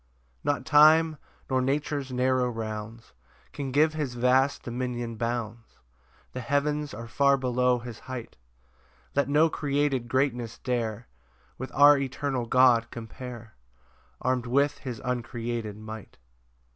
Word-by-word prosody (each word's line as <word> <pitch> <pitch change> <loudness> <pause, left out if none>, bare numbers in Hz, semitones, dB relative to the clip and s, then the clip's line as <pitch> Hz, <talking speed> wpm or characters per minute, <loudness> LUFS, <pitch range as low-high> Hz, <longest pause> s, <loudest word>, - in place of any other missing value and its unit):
2 - - -24
Not 140 -3 0
time, 155 +1 +6 0.3
nor 130 -1 +1
nature's 140 0 -1
narrow 125 0 +1
rounds, 110 0 -6 0.4
Can 135 -2 -4
give 155 +4 +3
his 145 -6 -3
vast 130 +3 +2
dominion 120 -1 -4
bounds, 115 0 -4 0.6
The 130 - -4
heavens 145 +3 0
are 115 +3 -7
far 140 +3 +3
below 125 -1 +1
his 120 -2 -8
height: 130 -3 -8 0.8
Let 140 0 +1
no 150 +3 +5
created 140 -5 -1
greatness 125 -3 -1
dare 115 -3 -3 0.5
With 130 - -6
our 145 0 +7
eternal 135 -2 -2
God 120 -2 +4
compare, 115 0 -9 0.7
Arm'd 125 -1 -1
with 140 +4 +1
his 125 -4 -6
uncreated 120 -3 -3
might. 110 -1 -9
125 Hz, 125 wpm, -27 LUFS, 120-140 Hz, 0.8 s, our